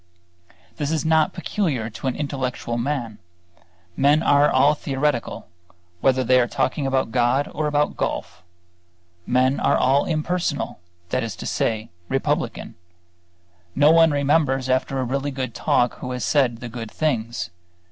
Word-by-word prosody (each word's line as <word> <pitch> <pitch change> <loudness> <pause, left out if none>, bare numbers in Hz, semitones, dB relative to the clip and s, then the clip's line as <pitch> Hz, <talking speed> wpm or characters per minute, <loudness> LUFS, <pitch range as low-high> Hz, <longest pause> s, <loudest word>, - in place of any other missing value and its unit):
This 145 -3 -2
is 160 0 -1
not 160 -1 +3
peculiar 165 - -2
to 105 +6 -6
intellectual 130 -3 -3
men; 120 -4 -3 0.8
men 145 +3 +3
are 145 +1 +4
all 140 +3 +4
theoretical, 140 -3 -2 0.5
whether 130 +3 +2
they 125 +1 +4
are 120 - +2
talking 140 +3 -1
about 130 -4 0
God 125 +3 +2
or 155 0 -1
about 150 0 0
golf. - - -3 0.9
Men 130 +2 +2
are 140 - +2
all 135 +2 +3
impersonal; 160 - -2 0.3
that 130 - 0
is 115 -6 -4
to - - -8
say, 110 -2 -1 0.2
republican. 135 0 -2 1.0
No 145 +2 +5
one 165 0 +6
remembers 140 -2 +1
after 130 +1 0
a 130 - 0
really 135 +3 -2
good 130 -3 -4
talk 120 +2 +1
who - - -6
has 125 - -3
said 125 -6 +1
the 120 - -5
good 115 -1 -7
things. 115 - -2
135 Hz, 145 wpm, -22 LUFS, 125-150 Hz, 1.0 s, one